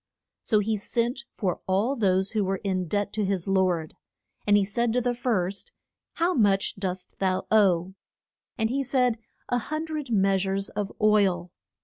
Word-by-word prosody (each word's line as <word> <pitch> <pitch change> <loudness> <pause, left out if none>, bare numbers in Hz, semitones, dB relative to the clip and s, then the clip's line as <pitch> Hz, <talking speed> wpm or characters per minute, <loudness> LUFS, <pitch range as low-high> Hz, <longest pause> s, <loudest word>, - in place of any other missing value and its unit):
So 215 -2 +2
he 215 +1 0
sent 240 +5 -2
for 185 -4 -2
all 205 +8 +1
those 190 -4 +1
who 215 -2 +1
were 190 0 -1
in 185 -3 -1
debt 205 +3 -1
to 215 - 0
his 190 -2 -1
lord. 185 -5 +1 0.5
And 205 0 +6
he 200 - +2
said 230 +3 0
to 250 - +2
the 245 0 0
first, 225 - -2 0.4
How 340 +2 +1
much 200 - +2
dost 185 -1 -4
thou 185 -1 0
owe? 190 -4 +3 0.6
And 220 0 0
he 275 +2 0
said, 250 -3 +1 0.3
A 245 - +1
hun 310 +6 -4
dred 310 -4 -5
mea 195 -3 +3
sures 195 +1 -1
of 205 -1 -2
oil. 195 -5 +2
205 Hz, 170 wpm, -26 LUFS, 190-235 Hz, 0.6 s, And